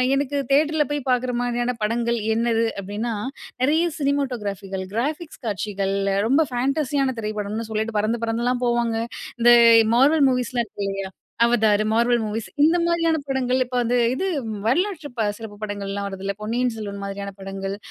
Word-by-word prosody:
எனக்கு 285 0 -1
தியேட்டர்ல 300 +2 +3
போய் 290 0 -1
பார்க்குற 250 0 +1
மாதிரியான 245 0 -1
படங்கள் 235 +2 0 0.2
என்னது 230 0 +2 0.2
அப்டீன்னா, 210 +4 -3 0.5
நிறைய 310 +6 +3
சினிமாட்டோகிராஃபிகள், 210 -9 -2
கிராபிக்ஸ் 300 +8 -3
காட்சிகள் 200 -2 -2 0.3
ரொம்ப 280 +6 +4
ஃபேண்டஸியான 270 +1 0
திரைப்படம்னு 215 +1 -3
சொல்லிட்டு 220 0 -1
பறந்து 220 +3 0
பறந்துலாம் 240 +2 0
போவாங்க. 235 -1 +1 0.4
இந்த 240 +1 +7 0.4
மார்வல் 285 +4 +5
மூவிஸ்லாம் 250 -2 0
இருக்கு 200 - -6
இல்லயா? 195 -1 -4 0.3
அவதார், 220 -3 +3
மார்வெல் 235 0 +2
மூவிஸ் 215 +1 -4
இந்த 325 +3 +5
மாதிரியான 330 -1 +2
படங்கள், 260 -1 +1
இப்ப 250 0 -3
அந்த 240 +2 +1 0.2
இது 380 - -1 0.4
வரலாற்று 330 - 0 0.3
சிறப்பு 215 -2 -9
படங்கள்லாம் 200 -1 -3
வருதுல்ல. 195 +1 -4
பொன்னியின் 240 +2 0
செல்வன் 200 -2 -6
மாதிரியான 200 0 -5
படங்கள். 195 0 -5
235 Hz, 135 wpm, -23 LUFS, 210-265 Hz, 0.5 s, இந்த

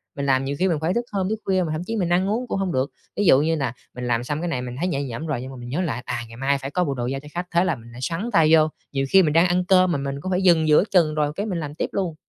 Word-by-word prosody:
Mình 140 - -3
làm 135 -1 +2
nhiều 140 +1 -2
khi 190 - +3
mình 170 -4 +1
phải 165 +3 0
thức 235 +2 -1
hôm, 195 -2 -1
thức 220 0 -2
khuya 190 -1 +2
mà 160 - -3
thậm 155 +2 -2
chí 225 - -3
mình 185 -6 0
ăn 180 +3 +2
uống 240 +4 -1
cũng 195 - -2
hông 190 -2 -1
được. 130 +2 0 0.3
Ví 205 - +1
dụ 135 -5 +6
như 160 +2 +1
là 135 -6 -2 0.2
mình 125 0 -4
làm 120 -1 +1
xong 145 +4 -3
cái 175 - -2
này, 130 -7 -2
mình 125 -1 -6
thấy 180 - 0
nhẹ 140 -6 -1
nhõm 135 +3 -5
rồi 140 -6 -2
nhưng 130 +1 -7
mà 130 - -9
mình 120 0 -8
nhớ 150 +8 -1
lại, 130 -9 -2
à, 120 - -3
ngày 115 0 -12
mai 140 +2 +1
phải 135 0 -6
có 180 +4 +1
bộ 145 -5 -1
đồ 120 -2 -3
giao 135 +2 -2
cho 150 - -13
khách, 175 +1 -3
thế 170 +1 +3
là 180 -4 0
mình 115 +1 -14
lại 120 +1 -10
xoắn 170 - -2
tay 160 -2 +5
vô. 155 -1 +6 0.2
Nhiều 135 -1 -1
khi 190 +4 +6
mình 150 -3 +1
đang 165 +3 +5
ăn 180 0 +1
cơm 185 -1 +4
mà 145 - +1
mình 140 0 -3
cũng 185 - -4
phải 180 - +1
dừng 165 -4 +4
giữa 150 +2 +5
chừng 165 -5 +3
rồi 150 -1 +1
cái 205 - -2
mình 185 -6 -2
làm 150 -2 -6
tiếp - - -2
luôn. 180 -5 -2
155 Hz, 360 wpm, -23 LUFS, 135-180 Hz, 0.3 s, dụ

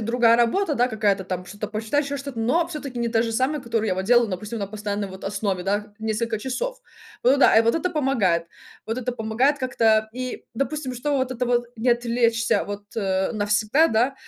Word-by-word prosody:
другая 230 +1 +4
работа 295 +8 +2
да 245 0 +2
какая-то 210 -4 +1
там 180 -1 -5
что-то 205 +2 -6
почитать 225 +7 -1
еще 285 0 -3
что-то, 275 -4 -6
но 320 +10 +2
всё-таки 285 -7 -6
не 235 - 0
та 225 0 +2
же 230 - -2
самая, 260 +6 0
которую 230 -2 -1
я 185 - +1
вот 190 +1 -3
делала 240 +2 +5
допустим 210 +3 -5
на 200 - -2
постоянной 205 0 -3
вот 190 0 -11
основе, 195 -2 -2
да, 200 +2 +1
вот 210 0 -13
несколько 220 +1 -1
часов. - - -4 0.4
Ну 265 +3 +5
да. 270 - +5
И 225 - +7
вот 230 +5 +2
это 345 +3 0
помогает. 240 - +1 0.4
Вот 225 +3 -3
это 250 0 -2
помогает 245 +6 +1
как-то 220 -4 +2
и, 255 0 -5
допустим, 275 +1 -2
что 280 +4 -1
вот 260 0 -1
это 250 -1 -2
вот 240 0 +1
не 230 +3 -1
отвлечься 235 -1 +2
вот, 205 0 -6
э, 190 -2 0
навсегда, 215 +7 +2
да. 245 +3 +1
230 Hz, 210 wpm, -24 LUFS, 210-255 Hz, 0.4 s, И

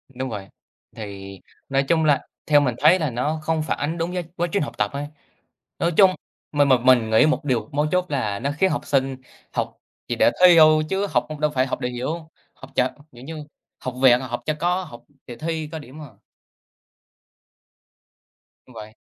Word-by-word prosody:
Đúng 130 +1 -3
vậy, 100 -4 -6 0.5
thì 100 -3 -8 0.3
nói 135 0 +2
chung 160 +3 +1
là 145 -3 +2 0.2
theo 145 -1 +5
mình 125 -5 0
thấy 165 +5 +5
là 155 -3 0
nó 145 +7 -2
không 160 0 0
phản - - -2
ánh 160 +4 -2
đúng 170 +1 -2
với 180 -1 -2
quá 175 0 -1
trình 200 - +1
học - - -7
tập 105 -1 0
á, 145 +1 -4 0.7
nói 170 - +1
chung 195 -2 +7 0.4
mình 145 -1 +3
mà 130 -2 +5
mình 120 -2 +4
nghĩ 110 +7 +5
một 155 0 0
điều 120 -6 -1
mấu 150 +2 +1
chốt 180 0 +2
là 110 -8 -1
nó 140 +6 -2
khiến 190 +2 +3
học 145 - -3
sinh 135 -1 0 0.4
học - - -3 0.3
chỉ - - -2
để - - +4
thi 180 -1 +8
thôi 155 -1 +6
chứ 195 +3 0
học 125 -4 +1
đâu 150 0 +2
phải 130 -2 +1
học 130 - -4
để 125 - -1
hiểu, 150 +7 -4 0.3
học - - -13
chệch, 125 0 +2 0.2
kiểu 120 +1 -13
như 155 0 -7 0.3
học 130 - -5
vẹt, 125 -2 +6
học 120 -2 -5
cho 155 - 0
có, 180 +2 +1
học 120 -8 -12 0.2
để 120 - -8
thi 160 0 -3
có 160 - -4
điểm 145 +1 -12
à. 150 - -9 2.6
Đúng 125 - -17
vậy. 110 0 -10
145 Hz, 205 wpm, -23 LUFS, 125-160 Hz, 2.6 s, thi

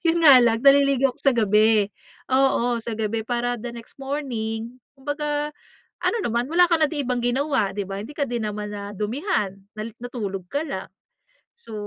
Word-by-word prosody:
'yon 330 +1 +3
nga 275 -4 +9
lang 230 -2 +3
naliligo 275 -1 +5
ako - - -22
sa 275 - +4
gabi, 215 0 +4 0.5
oo 245 -3 +2
sa 225 -1 -5
gabi 220 +1 -1
para 240 +1 -2
the 240 - -5
next 235 +3 -13
morning 245 -4 -4 0.2
kumbaga 295 +1 -2 0.5
ano - - +1
naman 235 +2 0
wala 345 +3 +5
ka 335 -2 +2
na 310 - +4
di 290 -3 -3
ibang 250 -1 -1
ginawa 245 -5 0
di 205 - -1
ba 195 +1 -5
hindi 255 +8 -9
ka 285 - +1
din 240 -4 -3
naman 210 0 -5
nadumihan 210 - -2 0.2
na 215 - -4 0.2
natulog 200 -7 -5
ka 285 +8 -2
lang. 290 - -5 0.7
So, 470 - -12
245 Hz, 175 wpm, -23 LUFS, 220-280 Hz, 0.7 s, nga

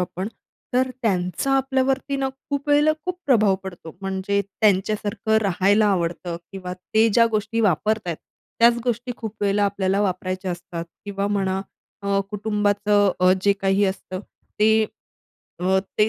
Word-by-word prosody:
आपण, 185 +3 -3 0.5
तर 260 +1 +3
त्यांचा 185 +4 0
आपल्यावरती 270 +1 0
ना 270 -1 0 0.2
खूप 280 0 -2
वेळेला 295 +1 +5
खूप 365 -1 -2
प्रभाव 215 -7 +4
पडतो, 175 -4 -9
म्हणजे 195 +1 -1
त्यांच्यासारखं 205 +2 +1
राहायला 200 +2 +3
आवडतं 175 -2 -1 0.2
किंवा 185 -2 -6
ते 220 +5 +2
ज्या 230 +2 +5
गोष्टी 215 +1 -1
वापरत 215 +3 +2
आहेत, 170 - -2 0.4
त्याच 235 0 +6
गोष्टी 245 +1 -1
खूप 220 -4 -6
वेळेला 205 0 +2
आपल्याला 195 -1 0
वापरायच्या 185 -1 -2
असतात 175 -1 -5 0.2
किंवा 200 0 -2
म्हणा 195 -2 0 0.4
अ, 200 0 +1
कुटुंबाचं 205 -1 +2
अ, 185 0 +6
जे 200 - +5
काही 195 +1 +3
असतं, 190 -1 -3 0.4
ते 220 +1 +5 0.8
अ, 190 +1 +3 0.2
ते 210 - +5
205 Hz, 140 wpm, -23 LUFS, 190-220 Hz, 0.8 s, त्याच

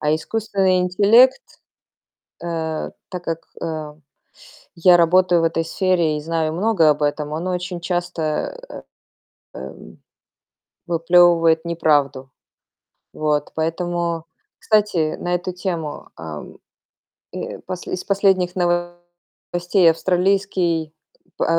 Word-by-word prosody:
А 150 0 +1
искусственный 190 +1 0
интеллект 210 - +5 1.0
э. 160 -2 -3 0.2
Так 180 -2 -6
как, 165 0 -4 0.2
э, 155 -2 -4 0.8
я 175 +1 +6
работаю 175 +1 +4
в - - +2
этой 165 0 0
сфере 170 -3 0
и - - -5
знаю 160 0 -1
много 185 -3 +3
об 150 0 +1
этом, 150 0 -1
он 165 +4 -3
очень 180 -1 -3
часто, 175 - -2
э, - - -8 0.8
эм - - -10 0.9
выплёвывает 170 -1 +4
неправду. 145 -6 0 0.8
Вот, 150 -1 -1
поэтому 170 0 -2 0.3
кстати, 205 -8 +1
на 175 0 -1
эту 180 +1 -3
тему, 175 -5 -5
ам, 80 -2 -9 0.7
э, - - -5
посл 180 -1 -7
из 180 - -3
последних 190 -3 +1 1.0
новостей 175 0 +3
австралийский, 180 -2 0 0.5
а, - - +1
170 Hz, 105 wpm, -20 LUFS, 160-185 Hz, 1.0 s, я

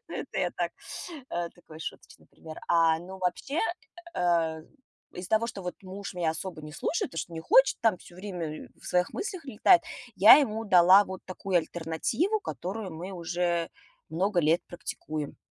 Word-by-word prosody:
Ну, - - -7
это - - -5
я - - +1
так, - - -1 0.6
э, 170 0 -2
такой 160 -3 -14
шуточный - - -9
пример. 160 -1 -12
А, 165 -1 +4
ну 190 +3 -9
вообще, 190 - -1 0.5
э, 165 -3 +1 0.5
из-за 180 0 -7
того, 220 +1 +3
что 200 -4 -6
вот 180 - -4
муж 195 +1 -7
меня 170 -3 +1
особо 160 -1 -6
не 150 - -9
слушает, 315 - -2
то, 165 - -5
что 170 - -4
не 165 - -5
хочет 265 +10 +5
там, 220 -5 +3
всё 175 - -15
время 175 -5 -6
в - - -18
своих 180 0 +1
мыслях 370 -6 -4
летает, 285 - +5 0.3
я 205 +4 +10
ему 225 -6 0
дала 185 0 +7
вот 190 -1 -8
такую 185 0 0
альтернативу, 175 - -1
которую 190 - -5
мы 175 +4 -7
уже 175 -1 -1 0.4
много 185 +2 +1
лет 160 +2 +3
практикуем. 155 -3 -5
180 Hz, 170 wpm, -28 LUFS, 165-200 Hz, 0.6 s, я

